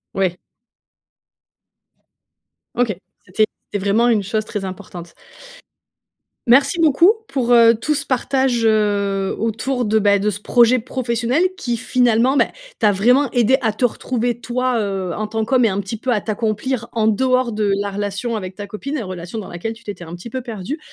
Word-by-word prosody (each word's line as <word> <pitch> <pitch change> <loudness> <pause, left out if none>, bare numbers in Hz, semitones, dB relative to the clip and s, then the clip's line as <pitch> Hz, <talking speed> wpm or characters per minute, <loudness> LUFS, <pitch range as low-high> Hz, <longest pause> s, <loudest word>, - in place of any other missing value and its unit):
Oui. 185 -2 0 2.4
OK, 235 -3 +1 0.3
c'était 215 +4 +2 0.3
c'était 205 -2 -3
vraiment 220 +4 +3
une 215 -3 +3
chose 215 +2 -2
très 205 -3 -5
importante. 180 -2 -8 1.3
Merci 275 +6 +4
beaucoup 330 +4 +5 0.2
pour, 245 -3 0
heu, 230 -1 +7
tout 300 +7 -1
ce 280 - -3
partage, 260 -2 0
heu, 200 -3 +1
autour 230 +4 -1
de, 220 0 +1
bah, 200 -1 +3
de 210 - +1
ce 205 -1 -4
projet 240 +3 +4
professionnel, 240 +2 -1 0.2
qui 240 -7 -2
finalement, 245 +3 +2
bah, - - +5 0.3
t'a 215 -3 +3
vraiment 245 +8 +3
aidé 245 +2 +3
à 220 -2 +1
te 245 - -5
retrouver 240 0 -1
toi, 250 0 -1
heu, 195 -4 -2
en 215 - -2
tant 220 +1 -2
qu'homme 250 +1 +2
et 225 - +3
un 195 - -2
petit 200 +3 -6
peu 250 +3 -2
à 210 - 0
t'accomplir 225 +3 -2
en 220 -1 +1
dehors 255 +2 +2
de 210 -2 0
la 205 - -2
relation 205 +3 -3
avec 185 -3 -5
ta 205 +1 -8
copine, 215 +8 -6
la 225 - -5
relation 185 +3 -6
dans 205 - -7
laquelle 200 +6 -5
tu 230 +1 -18
t'étais 205 -4 -7
un 165 0 -9
petit 175 +7 -9
peu 255 +1 -5
perdu. 230 - -5
225 Hz, 180 wpm, -19 LUFS, 205-245 Hz, 2.4 s, heu